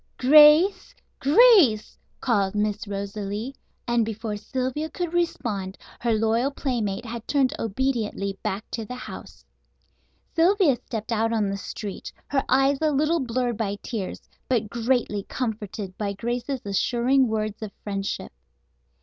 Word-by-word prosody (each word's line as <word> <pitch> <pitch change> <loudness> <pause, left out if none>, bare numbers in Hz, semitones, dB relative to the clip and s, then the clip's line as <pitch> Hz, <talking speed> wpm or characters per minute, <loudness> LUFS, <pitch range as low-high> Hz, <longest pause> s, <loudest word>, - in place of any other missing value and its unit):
"Grace! 305 - +6 0.2
Grace!" 300 - +5 0.3
called 205 -5 +1
Miss 210 0 -1
Rosalie, 200 +4 -4 0.3
and 240 -1 +2
before 220 0 -4
Sylvia 260 +7 -3
could 350 -1 -4
respond 230 - -2 0.2
her 235 - 0
loyal 225 +4 +2
playmate 240 -6 -2
had 235 -1 -7
turned 275 -3 +2
obediently 220 -4 -1
back 200 +3 -3
to 225 - -3
the 250 +3 -7
house. 250 - -10 0.9
Sylvia 335 - +4
stepped 225 -2 -6
out 225 0 +1
on 210 -3 +1
the - - -2
street, 200 0 -6 0.2
her 270 -1 +1
eyes 270 +2 +3
a 310 - +3
little 305 +4 +2
blurred 245 -2 -1
by 205 -3 -1
tears, 210 -6 -5 0.2
but 230 -5 0
greatly 235 -3 0
comforted 215 -5 -4
by 200 -2 -1
Grace's 240 +5 -3
assuring 245 +6 +2
words 215 -1 -2
of 215 -2 -5
friendship. 195 - -4
235 Hz, 130 wpm, -25 LUFS, 210-270 Hz, 0.9 s, Grace